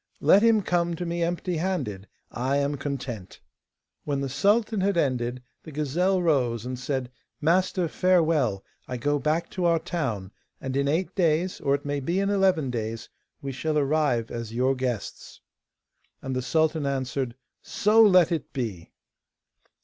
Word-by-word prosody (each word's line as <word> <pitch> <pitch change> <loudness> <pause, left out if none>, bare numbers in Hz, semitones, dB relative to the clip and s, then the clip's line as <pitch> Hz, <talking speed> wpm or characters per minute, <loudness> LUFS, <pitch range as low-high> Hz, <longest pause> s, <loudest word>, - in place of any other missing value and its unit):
Let 200 - +6
him 225 -2 +4
come 175 -1 0
to 175 - -4
me 170 0 -2
empty 175 +1 -1
handed, 135 - -2 0.2
I 130 +3 0
am 140 +1 0
content.' 135 -8 -5 0.6
When 145 -2 -1
the 135 -1 -2
sultan 205 - +2
had 195 -1 +1
ended, 125 -4 0 0.2
the 160 - -11
gazelle 175 +6 0
rose, 125 -8 +1
and 125 0 -4
said: 130 -1 -3 0.3
'Master, 180 +2 +2
farewell; 155 - +2 0.2
I 125 - -4
go 145 +4 0
back 155 +4 -1
to 180 - -2
our 170 -1 +4
town, 135 - -3 0.3
and 130 0 -4
in 140 0 +1
eight 165 +6 0
days, 175 0 +1
or 140 -1 +2
it 140 - -7
may 145 0 -1
be 170 +8 -1
in 200 0 +1
eleven 185 -9 +2
days, 115 -1 -4 0.3
we 135 - -3
shall 150 +3 -1
arrive 140 -5 +1
as 115 -2 -5
your 130 +2 +2
guests.' 125 -4 -4 0.8
And 130 -1 -3
the 130 - 0
sultan 155 +2 +1
answered: 130 -2 -2 0.3
'So 215 +2 +3
let 185 -6 +6
it 160 -6 -2
be. 110 - -4
145 Hz, 160 wpm, -26 LUFS, 130-175 Hz, 0.8 s, Let